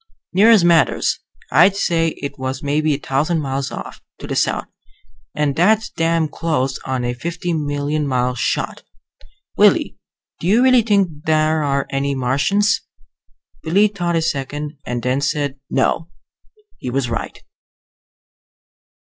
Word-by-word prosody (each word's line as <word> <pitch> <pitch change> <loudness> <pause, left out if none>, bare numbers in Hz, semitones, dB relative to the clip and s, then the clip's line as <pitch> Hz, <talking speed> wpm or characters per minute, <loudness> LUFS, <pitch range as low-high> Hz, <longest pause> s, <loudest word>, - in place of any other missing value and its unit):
"Near 200 +5 +5
as 220 -6 +6
matters. 170 -2 +3 0.3
I'd 185 +5 +5
say 165 -4 0
it 140 0 -5
was 130 +2 -4
maybe 150 +1 +1
a - - -3
thousand 145 +5 0
miles 135 -2 -2
off, - - -8 0.2
to - - -9
the - - -4
south. - - 0 0.7
And 150 -2 0
that's 215 +6 +2
damn 165 -1 +1
close 150 -4 -2
on 130 -2 -2
a 120 - -1
fifty 170 +7 -4
million 145 -1 -1
mile 125 -1 0
shot. 125 - -2 0.8
Willie, - - +3 0.4
do 165 - -3
you 225 +6 +4
really 255 -2 +6
think 195 -9 0
there 155 0 +2
are 140 -2 0
any 140 0 -1
Martians?" 140 +12 +1 0.8
Willie 200 +6 +3
thought 175 -4 -2
a 165 - +1
second 145 +1 -3
and 120 -1 -3
then 130 +2 0
said, 145 -1 -1
"No." 160 +5 0 0.7
He 125 - -5
was 130 0 -1
right. 115 -1 -4
150 Hz, 140 wpm, -19 LUFS, 135-170 Hz, 0.8 s, as